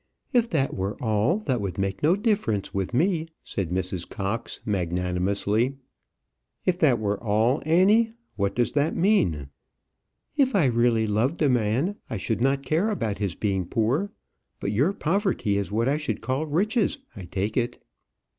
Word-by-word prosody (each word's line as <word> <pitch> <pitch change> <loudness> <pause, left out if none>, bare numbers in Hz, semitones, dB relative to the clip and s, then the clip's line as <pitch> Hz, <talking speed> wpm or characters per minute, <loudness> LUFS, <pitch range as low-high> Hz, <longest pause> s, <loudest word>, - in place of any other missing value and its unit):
"If 235 -2 +3
that 140 -4 0
were 95 +2 -3
all, 110 - +1
that 130 - -1
would 100 -3 -4
make 95 -1 -2
no 160 +5 +4
difference 200 - 0
with 95 -2 -2
me," 165 +5 +1 0.2
said 95 -5 -3
Mrs. 90 -1 -3
Cox, 105 +4 -3
magnanimously. 100 +6 0 0.9
"If 180 -1 +1
that 135 -7 +4
were 105 0 -2
all, 115 +5 +2
Annie! 210 +7 +4 0.2
What 100 -1 -1
does 120 -1 +1
that 150 +2 +1
mean?" 90 - +2 0.9
"If 270 -5 +2
I 180 -7 +4
really 120 -2 +3
loved 110 +9 0
a 145 - +4
man, 125 - +1
I 110 - -3
should 110 +3 -2
not 135 +1 +2
care 170 +8 +1
about 115 - -2
his 100 -5 -2
being 95 -4 -1
poor. 125 - 0 0.5
But 100 - -2
your 135 - +2
poverty 190 - 0
is 100 - -4
what 115 +3 +1
I 140 +2 +2
should 150 - -3
call 135 +4 -1
riches, 195 - +1 0.2
I 95 - -8
take 100 +4 -3
it." 120 0 -1
120 Hz, 165 wpm, -25 LUFS, 100-165 Hz, 0.9 s, no